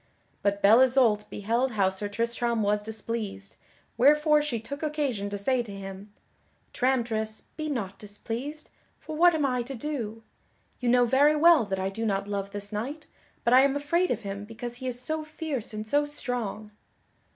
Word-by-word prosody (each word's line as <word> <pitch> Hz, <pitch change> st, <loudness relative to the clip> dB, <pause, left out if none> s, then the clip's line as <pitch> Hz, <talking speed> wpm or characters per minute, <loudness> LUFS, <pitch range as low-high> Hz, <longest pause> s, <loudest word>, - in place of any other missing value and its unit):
But 200 Hz, 0 st, 0 dB
Belle 215 Hz, +4 st, +7 dB
Isoult 245 Hz, -5 st, +3 dB
beheld 235 Hz, +5 st, -1 dB
how 195 Hz, -3 st, +2 dB
Sir 205 Hz, +2 st, -3 dB
Tristram 235 Hz, +1 st, -1 dB
was 205 Hz, +1 st, +1 dB
displeased, 210 Hz, -, -5 dB, 0.4 s
wherefore 300 Hz, +3 st, +5 dB
she 280 Hz, -6 st, -2 dB
took 280 Hz, +6 st, -7 dB
occasion 285 Hz, -10 st, -1 dB
to 205 Hz, -, -4 dB
say 250 Hz, +5 st, +1 dB
to 230 Hz, -4 st, -8 dB
him: 195 Hz, +1 st, -8 dB, 0.6 s
"Tramtris, 230 Hz, -4 st, 0 dB
be 310 Hz, -1 st, -4 dB
not 200 Hz, -9 st, -4 dB
displeased, 235 Hz, +8 st, -6 dB, 0.3 s
for 310 Hz, -, -7 dB
what 345 Hz, +1 st, +5 dB
am 300 Hz, -2 st, +1 dB
I 250 Hz, -2 st, 0 dB
to 270 Hz, +3 st, -6 dB
do? 230 Hz, -5 st, -4 dB, 0.6 s
You 245 Hz, -, 0 dB
know 245 Hz, 0 st, +5 dB
very 280 Hz, +5 st, +4 dB
well 315 Hz, -4 st, +6 dB
that 195 Hz, -1 st, -2 dB
I 190 Hz, 0 st, -1 dB
do 225 Hz, +4 st, -5 dB
not 200 Hz, -2 st, -1 dB
love 200 Hz, -1 st, -3 dB
this 205 Hz, 0 st, -6 dB
knight, 270 Hz, +9 st, -4 dB, 0.4 s
but 235 Hz, -, +3 dB
I 255 Hz, -, +8 dB
am 275 Hz, 0 st, +3 dB
afraid 335 Hz, +5 st, +1 dB
of -, -, -2 dB
him 200 Hz, 0 st, -5 dB
because 235 Hz, +3 st, -6 dB
he 260 Hz, -, -5 dB
is 245 Hz, -1 st, -2 dB
so 310 Hz, +4 st, -2 dB
fierce 305 Hz, -6 st, -4 dB
and 215 Hz, 0 st, -6 dB
so 290 Hz, +5 st, +2 dB
strong." 235 Hz, -7 st, -4 dB
235 Hz, 180 wpm, -27 LUFS, 205-280 Hz, 0.6 s, I